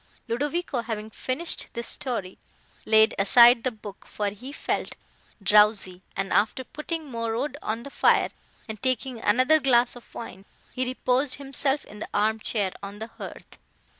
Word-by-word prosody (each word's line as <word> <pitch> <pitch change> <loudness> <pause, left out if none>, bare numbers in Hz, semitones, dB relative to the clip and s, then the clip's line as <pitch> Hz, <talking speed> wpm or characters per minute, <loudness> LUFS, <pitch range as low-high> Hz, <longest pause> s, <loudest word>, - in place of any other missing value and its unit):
Ludovico, 285 +3 -1
having 220 -1 -5
finished 275 +10 -1
this 235 0 -3
story, 215 -8 -3 0.5
laid 220 0 +5
aside 235 +4 +7
the 255 - +2
book, 210 -4 -11
for 205 -1 -2
he 230 +7 -9
felt - - -3 0.5
drowsy, 205 -2 +4 0.2
and, 195 0 -2
after 220 +5 +2
putting 315 +4 -5
more 230 -1 -2
wood 280 +3 -2
on 225 +2 -3
the 280 - -9
fire - - +3 0.4
and 220 -2 -7
taking 255 -1 -1
another 255 +9 +4
glass 250 -4 +3
of 245 - -15
wine, 195 -4 -8 0.3
he 255 - -1
reposed 255 +1 +1
himself 275 0 0
in 210 - -12
the - - -6
arm 220 +2 +2
chair 205 -3 -1
on 200 +1 -7
the 220 - -5
hearth. 225 - -11
235 Hz, 160 wpm, -26 LUFS, 210-260 Hz, 0.5 s, aside